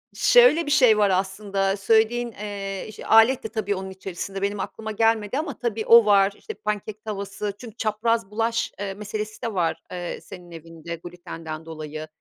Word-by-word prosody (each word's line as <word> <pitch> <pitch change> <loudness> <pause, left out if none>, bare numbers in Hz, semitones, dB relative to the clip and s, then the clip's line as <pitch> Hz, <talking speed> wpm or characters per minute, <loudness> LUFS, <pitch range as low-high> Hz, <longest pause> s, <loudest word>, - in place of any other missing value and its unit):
Şöyle 485 -10 +6
bir 290 - -3
şey 250 -7 +6
var 205 -1 +4
aslında, 195 +1 0
söylediğin, 225 +4 +2
eee, 200 -1 -6
ş - - -10
alet 225 +4 +5
de - - -3
tabii 205 -2 -2
onun 190 0 -5
içerisinde, 190 +1 -6
benim 200 0 -1
aklıma 220 +3 -5
gelmedi 225 +2 +1
ama 295 -5 -3
tabii, 225 -3 -2
o 230 -1 +8
var, 200 -1 +4
işte, 440 - -8
pancake 210 - -4
tavası 200 -1 -4
çünkü 230 -4 -10
çapraz 220 -1 0
bulaş, 230 +1 0
eee, 195 -1 -3
meselesi 210 +1 -6
de 230 - -3
var, 175 -4 0
eee, 175 -1 -5
senin 180 -2 -12
evinde 165 0 -8
glütenden 165 -2 -8
dolayı. 155 -1 -7
205 Hz, 170 wpm, -24 LUFS, 190-225 Hz, -, o